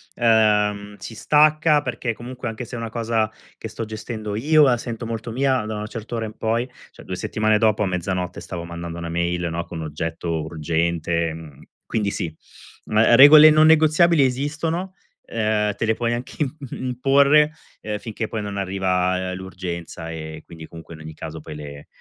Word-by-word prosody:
Ehm, 105 -3 +2
si 110 +4 -9
stacca, 150 +2 +4
perché, 120 -4 -3
comunque, 120 +2 -7
anche 115 +2 -5
se 120 - -8
è - - -4
una 115 -1 -4
cosa 115 -2 0 0.3
che - - -7
sto 110 +2 -5
gestendo 110 -1 -6
io, 150 +7 +4
la 130 -4 +4
sento 115 0 -6
molto 115 0 -5
mia, 130 -2 +1
da 110 0 -4
una 105 0 -5
certa 115 +2 -7
ora 115 - -2
in 110 0 -9
poi". 115 +3 -1 0.2
Cioè, - - -14
2 - - -4
settimane 110 0 +1
dopo, 110 -1 +2
a 100 - 0
mezzanotte, 90 0 -3
stavo 85 -2 -6
mandando 85 0 -7
1 85 0 -5
mail, 85 +1 -1
no, 85 +1 -3
con 80 -2 -7
oggetto 80 +1 -3
urgente, 85 +1 -1
mhmm, 80 -4 -11 0.2
quindi 105 -3 -1
sì. 85 -5 -4 0.5
Mhmm, 105 - -2
uhm, 110 +2 +6
regole 150 +4 +10
non 155 0 +5
negoziabili 160 0 +5
esistono, 160 +8 -2 0.3
ehm, 110 -2 0
te 115 - -2
le 110 - +2
puoi 120 0 -1
anche 120 +2 -5 0.4
imporre 140 +4 +3 0.4
finché, 110 +1 -5
poi, 110 -1 -4
non 100 -1 -5
arriva 95 -1 0
l'urgenza 90 -3 -6
e 80 -1 -7
quindi, 80 -1 -11
comunque, 85 0 -11
in 80 - -11
ogni 80 0 -9
caso, 80 0 -7
poi 75 0 -9
le 70 -1 -9
110 Hz, 180 wpm, -22 LUFS, 85-120 Hz, 0.5 s, regole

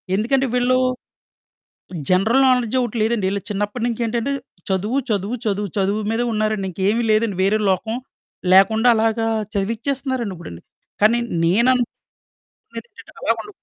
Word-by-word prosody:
ఎందుకంటే, 265 +6 +1
వీళ్ళు 250 +1 +3 1.3
జనరల్ 220 +9 +3
నాలెడ్జొకటి 250 -1 +1
లేదండి. 220 -3 +1
ఈళ్ళకి 200 -1 -4
చిన్నప్పడనుంచేంటంటే, 230 +4 -2 0.4
చదువు, 210 +8 0
చదువు, 205 +3 -1
చదువు, 205 0 -1
చదువు 200 +2 +1
మీదే 235 +2 0
ఉన్నారండి, 215 -2 -1
ఇంకేవి 200 +6 0
లేదండి. 215 -2 +1
వేరే 205 +3 +2
లోకం 220 +5 -1 0.6
లేకుండలాగా 225 +3 +4 0.3
చదివిచ్చేస్తన్నారండిప్పుడండి, 225 - -3 0.4
కానీ 220 +3 +4 1.3
నేననుకునేదేంటంటే 480 - -13
అలాగుండ - - -1
220 Hz, 95 wpm, -20 LUFS, 200-240 Hz, 1.3 s, లేకుండలాగా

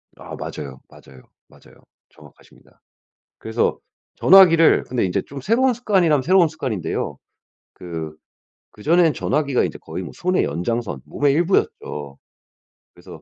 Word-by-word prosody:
아 - - -10
맞아요. 70 -3 -8
맞아요. 65 -1 -17 0.2
맞아요. - - -21 0.3
정확하십니다. - - -21 0.6
그래서 110 +1 -1 0.4
전화기를 170 -4 +6
근데 125 -4 -2
인제 90 - -1
좀 140 0 -10
새로운 240 - +2
습관이라면 185 - +2
새로운 180 +3 +4
습관인데요. 130 - -4 0.6
그 80 -3 -7 0.6
그전엔 165 +8 +2
전화기가 140 -4 0
이제 - - -4
거의 85 +4 -7
뭐 - - -8
손의 185 +1 0
연장선 100 - -3
몸의 145 -1 0
일부였죠. 75 - -1 0.8
그래서 - - -14
140 Hz, 320 characters per minute, -21 LUFS, -, 0.8 s, 전화기를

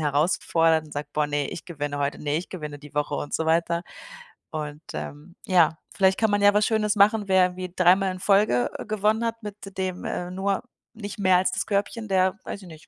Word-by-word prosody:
herausfordert 160 +1 +2
und 150 - -14
sagt: 145 +1 -5
„Boah, 150 -1 +2
ne, 145 -1 -1
ich - - -7
gewinne 145 -4 -4
heute. 140 0 -1
Ne, 145 0 0
ich 175 - -7
gewinne 150 -5 -6
die 145 0 -14
Woche“, 150 0 -1
und 145 - -4
so 160 - 0
weiter 170 +1 +1 0.7
und, 150 -1 -5
ähm, 155 +4 -7
ja, 170 -5 +4 0.2
vielleicht 190 -1 +3
kann 220 -2 +2
man 205 - +2
ja 205 0 +6
was 210 0 +3
Schönes 215 -1 +1
machen, 210 +1 +4
wer 185 -1 +3
wie 185 0 -4
dreimal 185 +2 +4
in 185 - -8
Folge, 195 - +3
äh, - - -7
gewonnen 215 +2 +1
hat 230 0 -3
mit 205 -2 -9
dem, 185 -1 -3
äh, 180 0 -3
nur 195 +1 -1 0.3
nicht 210 -2 -8
mehr 185 -2 +4
als 185 - +1
das - - -2
Körbchen, 210 +2 -2
der 190 0 +2
weiß 200 - -6
ich 185 - -12
nicht, 160 -1 -14
185 Hz, 220 wpm, -25 LUFS, 155-200 Hz, 0.7 s, ja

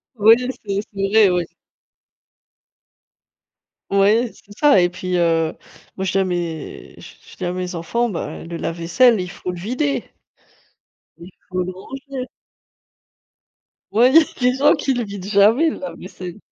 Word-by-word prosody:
Oui, 220 +1 +7
c'est 215 -6 -3
c'est 195 0 -1
vrai, 215 -3 +6
oui. 175 -1 0 2.5
Oui, 210 +4 +3
c'est 205 0 -17
ça 285 -11 +5
et 175 - +2
puis, 180 0 -3
heu, 165 -2 +1 0.4
moi, 190 - -3
je 185 - -1
dis 195 - +1
à 190 - +3
mes 170 -4 -5
je - - -13
je - - -15
je - - -14
dis - - -4
à 175 - -1
mes 180 0 -4
enfants: 235 +9 -1
«Bah 170 - -5
et - - -10
le 170 0 -6
lave-vaisselle, 175 +10 +2
il 180 -1 -5
faut 180 - -6
le 180 - -6
vider». 255 - -2 1.1
Il 170 +3 -12 0.2
faut 185 0 -1
le 185 - -4 0.4
vider. 260 -2 -5 1.6
Ouais, 245 +5 +4 0.3
les 250 0 +3
gens 285 +2 +5
qui 270 - -1
le 245 - -1
vident 200 -2 -8
jamais 215 +10 +4
le - - -7
lave-vaisselle. 185 -8 -8
195 Hz, 160 wpm, -20 LUFS, 180-235 Hz, 2.5 s, Oui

